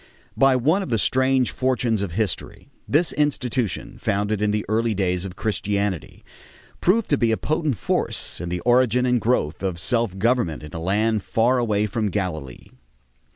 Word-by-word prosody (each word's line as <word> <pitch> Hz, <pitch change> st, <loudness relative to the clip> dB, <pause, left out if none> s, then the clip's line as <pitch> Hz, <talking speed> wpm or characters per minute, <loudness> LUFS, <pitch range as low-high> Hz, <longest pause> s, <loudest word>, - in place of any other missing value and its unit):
By 135 Hz, -1 st, +4 dB
one 155 Hz, +10 st, +2 dB
of 190 Hz, -, -5 dB
the 115 Hz, -, +1 dB
strange 130 Hz, +3 st, +2 dB
fortunes 125 Hz, -4 st, 0 dB
of 95 Hz, -5 st, -3 dB
history, 105 Hz, +1 st, -3 dB, 0.2 s
this 155 Hz, +4 st, +2 dB
institution, 130 Hz, -6 st, -1 dB
founded 105 Hz, +1 st, -1 dB
in 105 Hz, -, +2 dB
the 105 Hz, 0 st, -1 dB
early 110 Hz, +1 st, +1 dB
days 90 Hz, -1 st, 0 dB
of 95 Hz, -1 st, -7 dB
Christianity, 100 Hz, -3 st, -2 dB, 0.6 s
proved 210 Hz, +5 st, +2 dB
to 145 Hz, -, +3 dB
be 115 Hz, -2 st, +2 dB
a 110 Hz, -, +1 dB
potent 155 Hz, -5 st, -1 dB
force -, -, -2 dB
in 85 Hz, -, -4 dB
the 90 Hz, 0 st, -3 dB
origin 125 Hz, 0 st, +3 dB
and 125 Hz, -2 st, +2 dB
growth 95 Hz, -10 st, 0 dB
of 95 Hz, -3 st, -2 dB
self 115 Hz, -1 st, 0 dB
government 110 Hz, -8 st, 0 dB
in 75 Hz, -, -10 dB
a 80 Hz, -, -4 dB
land 105 Hz, +5 st, +1 dB
far 120 Hz, +6 st, +1 dB
away 105 Hz, -3 st, +1 dB
from 105 Hz, 0 st, -1 dB
Galilee. 80 Hz, -10 st, -4 dB
110 Hz, 170 wpm, -23 LUFS, 95-125 Hz, 0.6 s, By